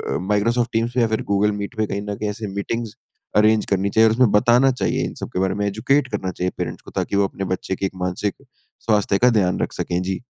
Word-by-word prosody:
अ, - - +1
Microsoft 115 +4 +1
teams 115 +1 0
पे 125 - +3
या 115 - +3
फिर 110 0 -1
गूगल 100 +1 +3
मीट 100 +5 -6
पे 110 - +1
कहीं 100 - -3
न 100 - -2
कहीं 105 - -2
ऐसे 105 +1 -5
मीटिंग्स 115 +2 -3 0.4
अरेंज 110 0 +4
करनी 100 +1 +1
चाहिए। 110 +2 +5
और - - +1
उसमें 125 -3 +4
बताना 120 +5 +4
चाहिए 125 - -1
इन - - -5
सब - - -4
के - - -1
बारे 95 0 +1
में 105 - -1
एजुकेट 130 +8 +1
करना 95 - -2
चाहिए 90 0 -2
पैरेंट्स - - -4
को - - -12
ताकि - - -2
वो 100 - +4
अपने 95 - -5
बच्चे 95 +1 -3
की 95 - -2
एक 95 - -4
मानसिक 100 +3 -2 0.5
स्वास्थ्य 105 -2 +2
का 125 +4 +5
ध्यान 90 -2 +1
रख - - -2
सकें। 90 0 -2
जी। 95 +2 -3
105 Hz, 255 wpm, -21 LUFS, 100-115 Hz, 0.5 s, चाहिए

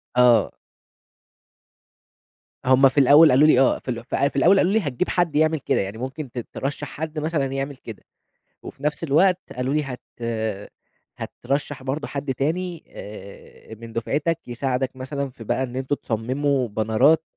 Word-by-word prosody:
آه. 120 -4 +5 2.1
هُم 130 +1 +6
في 130 - -14
الأول 145 +4 +7
قالوا 140 +4 +6
لي 140 - +5
آه 135 - +3
في 130 - -5
ال 115 -1 -5 0.3
في - - -21
الأول 180 +8 +5
قالوا 185 0 +3
لي 220 - +3
هتجيب 150 - -2
حد 175 -4 0
يعمل 155 +1 +3
كده، - - 0
يعني 100 +2 -5
ممكن 130 +2 -6
ت - - -12 0.2
ترَشّح 145 +2 -4
حد 155 +2 -5
مثلًا 155 -2 -1
يعمل 135 +1 -3
كده، 115 -4 -11 0.6
وفي 140 - -11
نفس 150 +2 -1
الوقت 175 +5 +3
قالوا 125 +2 -2
لي 150 0 +1
هت 130 -3 -7 1.2
هترَشّح 140 +1 -4
برضه 135 +3 -3
حد 140 -1 -3
تاني 165 +5 -2
آآ 100 +2 -11
من 115 +1 -11
دُفعتك 145 +8 -1
يساعدك 130 +1 -2
مثلًا 140 +2 -4
في 125 -3 -12
بقى 130 - -1
إن 125 -1 -6
أنتم 130 +2 -1
تصمموا 130 +3 -1
بنرات 110 +9 +3
135 Hz, 160 wpm, -23 LUFS, 125-150 Hz, 2.1 s, الأول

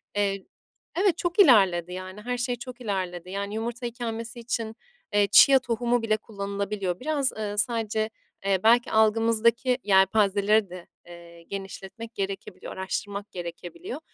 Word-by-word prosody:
eee, 195 -1 0 0.5
evet. 370 -2 +2
Çok 350 +3 -2
ilerledi, 190 - +5
yani, 185 +2 -7
her 245 +2 -3
şey 245 0 -1
çok 250 +1 -10
ilerledi, 185 -4 -3
yani, 200 +1 -4
yumurta 235 +2 -4
ikamesi 235 0 -5
için, 230 -2 -3 0.4
eee, 205 -1 +4
chia 270 +5 +8
tohumu 240 0 0
bile 215 -1 +1
kullanılabiliyor. 200 -3 -4
Biraz, 285 -1 0
ııı, 210 -1 -5
sadece, 220 -1 0 0.4
eee, 195 -2 +2
belki 240 +2 +4
algımızdaki 230 +3 +3
yelpazeleri 200 +1 +3
de, 180 -1 -10 0.2
eee, 170 -1 -13
genişletmek 195 +4 -8
gerekebiliyor, 195 -1 -5
araştırmak 200 +2 -4
gerekebiliyor 175 - -7
210 Hz, 130 wpm, -26 LUFS, 195-235 Hz, 0.5 s, chia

